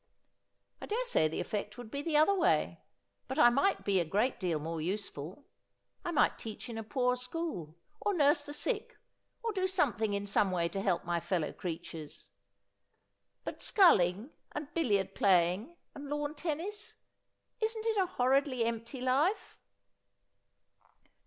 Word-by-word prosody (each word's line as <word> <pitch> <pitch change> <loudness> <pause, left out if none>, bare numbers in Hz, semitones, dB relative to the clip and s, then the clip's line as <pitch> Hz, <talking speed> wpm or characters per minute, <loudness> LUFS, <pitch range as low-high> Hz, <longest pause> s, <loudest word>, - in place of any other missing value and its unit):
' - - -45
I - - -6
daresay 470 - +2
the 155 - -4
effect 210 +1 -3
would 240 -3 -9
be 280 - -3
the 305 0 +1
other 310 +6 +5
way; 375 -3 +1 0.5
but 265 - -4
I 240 - +7
might 280 +11 +1
be 195 -2 +3
a - - +2
great 210 +10 0
deal 175 -4 0
more 160 +1 -4
useful. 185 - -5 0.6
I - - -3
might 320 -3 +2
teach 225 +2 -7
in 225 -1 -5
a - - -5
poor 250 +2 +1
school, 250 - -4 0.2
or 415 - 0
nurse 290 -1 +4
the - - -5
sick, 420 +9 -2 0.5
or 455 -1 -1
do 375 -2 +1
something 235 - +1
in 200 0 -2
some 200 0 +2
way 170 -2 0
to 195 +3 -3
help 185 -4 0
my 175 0 0
fellow 170 -3 -1
creatures. 165 -3 -7 1.1
But - - -6
sculling, 210 - +4 0.2
and 295 -1 -6
billiard 200 - +1
playing, 190 - +2 0.2
and 285 0 -8
lawn 295 0 -2
tennis 340 +7 -4 0.3
— - - -50
isn't 440 0 -1
it 445 -2 +1
a 380 -2 +3
horridly 260 -4 +2
empty 230 +3 -4
life 280 +11 +1
250 Hz, 160 wpm, -32 LUFS, 195-315 Hz, 1.1 s, I